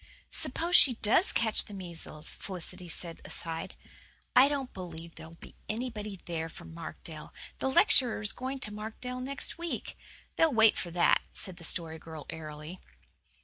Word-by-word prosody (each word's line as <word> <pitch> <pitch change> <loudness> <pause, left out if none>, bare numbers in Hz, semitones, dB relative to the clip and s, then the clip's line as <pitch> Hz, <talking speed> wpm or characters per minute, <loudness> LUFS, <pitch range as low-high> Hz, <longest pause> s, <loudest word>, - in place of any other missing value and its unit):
"Suppose 345 +1 +1
she 255 -4 +7
DOES 225 - +3
catch 220 -2 +6
the 205 - -9
measles?" 170 -4 -4
Felicity 180 -1 -5
said 165 0 -4
aside. 165 -1 -4 0.6
"I 255 +2 +8
don't 280 -3 -3
believe 170 -2 -8
there'll 160 +1 -11
be - - -9 0.2
anybody 215 -4 -3
there 165 -1 -3
from 160 - -11
Markdale. 160 -1 -8 0.2
The 265 - 0
lecturer 255 -2 +5
is 210 -2 -1
going 260 +2 -4
to 210 - -1
Markdale 220 +4 -5
next 275 +5 -4
week. 340 0 -4 0.4
They'll 325 -3 +4
wait 220 -1 +6
for 175 - -3
that," 170 +1 +4
said 185 -3 +2
the - - -11
Story 160 -1 +1
Girl 160 -2 -9
airily. 155 +2 -8
190 Hz, 155 wpm, -30 LUFS, 165-250 Hz, 0.6 s, I